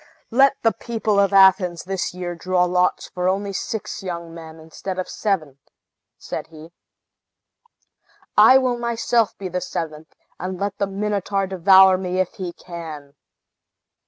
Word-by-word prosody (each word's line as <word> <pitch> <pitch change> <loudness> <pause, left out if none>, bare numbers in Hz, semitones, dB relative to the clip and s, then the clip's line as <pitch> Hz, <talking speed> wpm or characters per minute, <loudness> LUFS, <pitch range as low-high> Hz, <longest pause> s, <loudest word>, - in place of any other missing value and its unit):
"Let 270 +3 +4
the 225 - +4
people 220 -4 -1
of 200 0 +3
Athens 190 -3 +4
this 190 0 -3
year 180 -1 -5
draw 180 +1 0
lots 180 0 0
for 180 0 -1
only 200 +1 -2
six 220 +3 -4
young 170 -3 -6
men, 160 -1 -11
instead 160 +4 -7
of 185 - -3
seven," 155 -10 -2 0.6
said - - -6
he, 160 +1 -13 1.6
"I 260 - +8
will 250 -2 0
myself 235 -1 0
be 195 - -5
the 180 0 -3
seventh; 160 -3 -6 0.2
and 185 +1 -5
let 200 0 -3
the 200 - 0
Minotaur 200 0 -2
devour 190 0 +5
me 185 0 -2
if 185 - -1
he 185 -2 -5
can!" 160 -5 -9
185 Hz, 145 wpm, -21 LUFS, 170-200 Hz, 1.6 s, I